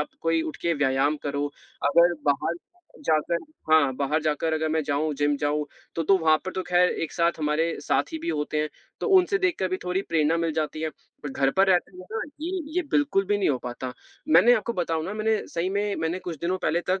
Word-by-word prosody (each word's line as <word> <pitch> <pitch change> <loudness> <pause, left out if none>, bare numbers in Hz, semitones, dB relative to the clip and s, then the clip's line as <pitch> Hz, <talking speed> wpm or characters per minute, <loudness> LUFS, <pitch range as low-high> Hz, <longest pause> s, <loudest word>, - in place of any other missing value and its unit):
आप 150 - -2
कोई 165 0 +1
उठ 155 - -5
के 170 - +2
व्यायाम 135 +3 +2
करो। 145 0 -1 0.4
अगर 170 +3 +5
बाहर 145 +4 +1 0.5
जाकर 160 +2 +2 0.3
हाँ, 140 -5 +5
बाहर 150 +3 0
जाकर 160 +1 0
अगर 160 0 0
मैं 160 0 +1
जाऊँ, 145 +2 0
जिम 145 0 +1
जाऊँ, 145 +1 -1 0.3
तो 165 - -1
तो 195 +5 +4
वहाँ 155 -1 +4
पर 185 - -4
तो 185 - -2
ख़ैर 180 0 +3
एक 160 - -3
साथ 170 -1 +1
हमारे 155 +2 0
साथी 320 - 0
भी 335 +2 -5
होते 150 - -1
हैं, 155 - -1 0.3
तो - - -1
उनसे 375 +2 +3
देखकर 350 - 0
भी 185 - -1
थोड़ी 180 +2 0
प्रेरणा 160 0 +2
मिल 165 -1 0
जाती 155 0 -2
है, 160 - -1 0.3
पर 145 - -4
घर 135 0 +1
पर 195 +1 +5
रहते 180 +1 +2
हुए 185 - -10
ना, 225 - -2 0.2
ये 360 +3 -2
ये 360 - +2
बिल्कुल 280 -10 +2
भी 205 0 +1
नहीं 195 - +2
हो 135 - +2
पाता। 125 +1 -6 0.4
मैंने 245 -5 +7
आपको 235 +1 -1
बताऊँ 165 -4 -1
ना, 195 - -4
मैंने 220 0 +1
सही 170 +2 -2
में, 205 0 -1
मैंने 165 +3 -1
कुछ 175 -3 -6
दिनों 180 +2 -1
पहले 170 0 0
तक, 190 - +1
165 Hz, 225 wpm, -25 LUFS, 150-190 Hz, 0.5 s, मैंने